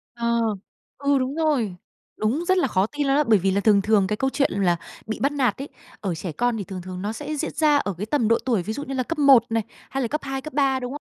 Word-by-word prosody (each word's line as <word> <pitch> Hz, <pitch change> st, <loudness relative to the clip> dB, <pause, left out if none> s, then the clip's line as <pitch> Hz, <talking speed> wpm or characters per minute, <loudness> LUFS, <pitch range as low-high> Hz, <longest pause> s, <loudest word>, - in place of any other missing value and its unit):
Ờ, 235 Hz, 0 st, 0 dB, 0.6 s
ừ, 280 Hz, 0 st, +2 dB
đúng 260 Hz, +2 st, -2 dB
rồi. 285 Hz, -, 0 dB, 0.4 s
Đúng, 250 Hz, +11 st, 0 dB
rất 375 Hz, +1 st, +2 dB
là 360 Hz, -, +2 dB
khó 190 Hz, +2 st, +2 dB
tin 290 Hz, +4 st, -3 dB
luôn 275 Hz, +1 st, +3 dB
á. 300 Hz, -, +3 dB
Bởi 220 Hz, -4 st, +4 dB
vì 195 Hz, +2 st, +1 dB
là 200 Hz, +1 st, +1 dB
thường 200 Hz, -1 st, +4 dB
thường 210 Hz, -2 st, +3 dB
cái 210 Hz, +2 st, -1 dB
câu 265 Hz, +3 st, 0 dB
chuyện 280 Hz, 0 st, +1 dB
là 185 Hz, -3 st, +2 dB, 0.3 s
bị 220 Hz, -, -4 dB
bắt 275 Hz, +3 st, +1 dB
nạt 255 Hz, -7 st, +1 dB
ấy, 285 Hz, -, -7 dB, 0.3 s
ở 190 Hz, -4 st, -2 dB
trẻ 165 Hz, +1 st, -5 dB
con 245 Hz, +5 st, 0 dB
thì 205 Hz, -, -4 dB
thường 185 Hz, -1 st, -7 dB
thường 185 Hz, +1 st, -7 dB
nó 210 Hz, +2 st, -2 dB
sẽ 295 Hz, +5 st, -5 dB
diễn 315 Hz, -, -3 dB
ra 300 Hz, -2 st, +4 dB
ở 200 Hz, -9 st, -1 dB
cái 210 Hz, -, -3 dB
tầm 230 Hz, -3 st, +1 dB
độ 230 Hz, -, +4 dB
tuổi 230 Hz, -8 st, +1 dB
ví 215 Hz, -, -4 dB
dụ 285 Hz, +6 st, -5 dB
như 270 Hz, -, -5 dB
là 255 Hz, -, 0 dB
cấp 330 Hz, +5 st, -4 dB
1 275 Hz, -5 st, +7 dB
này, 225 Hz, -1 st, +1 dB, 0.3 s
hay 270 Hz, 0 st, -2 dB
là 235 Hz, -, -1 dB
cấp 300 Hz, +6 st, -2 dB
2, 270 Hz, -1 st, -3 dB
cấp 310 Hz, -, -8 dB
3, 270 Hz, -2 st, +2 dB
đúng 250 Hz, +1 st, -5 dB
không? 295 Hz, -, -7 dB
245 Hz, 290 wpm, -23 LUFS, 210-285 Hz, 0.6 s, 1